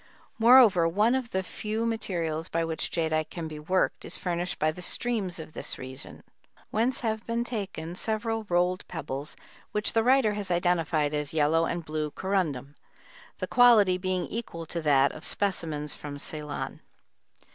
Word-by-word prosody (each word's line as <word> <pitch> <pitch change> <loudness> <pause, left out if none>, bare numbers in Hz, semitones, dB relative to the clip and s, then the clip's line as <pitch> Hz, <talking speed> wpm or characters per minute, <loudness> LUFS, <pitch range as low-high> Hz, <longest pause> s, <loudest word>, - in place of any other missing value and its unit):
Moreover, 225 -8 +7
one 210 +8 +3
of 260 -3 -1
the 190 -2 -1
few 215 +4 -3
materials 170 -8 -2
by 165 0 0
which 160 -1 -2
jadeite 155 -2 0
can 165 -2 -5
be 155 -1 -7
worked 185 +5 0
is - - -4
furnished 175 0 -2
by 155 0 +2
the 180 - -10
streams 210 -3 -2
of 155 -1 -9
this - - -5
region, 130 0 -8 0.5
whence 235 +4 0
have 220 -2 -1
been 235 0 0
taken 195 -8 -5
several 220 +2 -2
rolled 180 +1 +2
pebbles 145 -3 -4 0.4
which 210 0 +1
the 225 - +3
writer 255 -3 +4
has 205 -2 -4
identified 170 -4 +1
as 150 0 -1
yellow 160 +2 +3
and 170 -1 -3
blue 155 -1 -2
corundum, 155 -7 -2 0.6
the - - -2
quality 215 -7 +5
being 185 -1 -1
equal 190 -8 -5
to 170 +1 -4
that 140 -3 +4
of 155 - -10
specimens 160 -8 -1
from 145 -1 -7
Ceylon. 150 0 -4
175 Hz, 160 wpm, -28 LUFS, 155-215 Hz, 0.6 s, Moreover